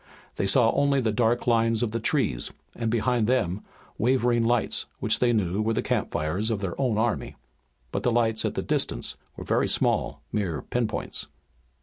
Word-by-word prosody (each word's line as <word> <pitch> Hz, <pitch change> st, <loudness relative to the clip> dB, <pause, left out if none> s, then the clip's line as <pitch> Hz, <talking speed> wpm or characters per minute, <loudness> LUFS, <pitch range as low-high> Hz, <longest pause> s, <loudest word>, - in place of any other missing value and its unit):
They 100 Hz, -, 0 dB
saw 115 Hz, +3 st, +5 dB
only 140 Hz, -1 st, +2 dB
the 115 Hz, -4 st, +1 dB
dark 115 Hz, +2 st, +1 dB
line 115 Hz, -1 st, +3 dB
of 115 Hz, -, -1 dB
the 115 Hz, -, -2 dB
trees, 115 Hz, -, 0 dB, 0.3 s
and 115 Hz, -1 st, -2 dB
behind 120 Hz, 0 st, +1 dB
them, 105 Hz, -6 st, +1 dB, 0.4 s
wavering 120 Hz, 0 st, +2 dB
lights 120 Hz, 0 st, +1 dB
which -, -, +1 dB
they 120 Hz, -1 st, +3 dB
knew 100 Hz, -3 st, 0 dB
were 110 Hz, +1 st, 0 dB
the -, -, 0 dB
campfires 85 Hz, +7 st, -1 dB
of 110 Hz, -3 st, -1 dB
their 95 Hz, -3 st, -3 dB
own 125 Hz, -5 st, +1 dB
army. 115 Hz, 0 st, -1 dB, 0.6 s
But -, -, -2 dB
the 125 Hz, -, +1 dB
lights 115 Hz, -2 st, +1 dB
at -, -, -2 dB
the -, -, -2 dB
distance -, -, -1 dB, 0.2 s
were -, -, -6 dB
very -, -, +1 dB
small, -, -, 0 dB
mere 90 Hz, -8 st, -2 dB
pin 120 Hz, -2 st, -1 dB
points. 105 Hz, -, -4 dB
115 Hz, 185 wpm, -26 LUFS, 105-120 Hz, 0.6 s, saw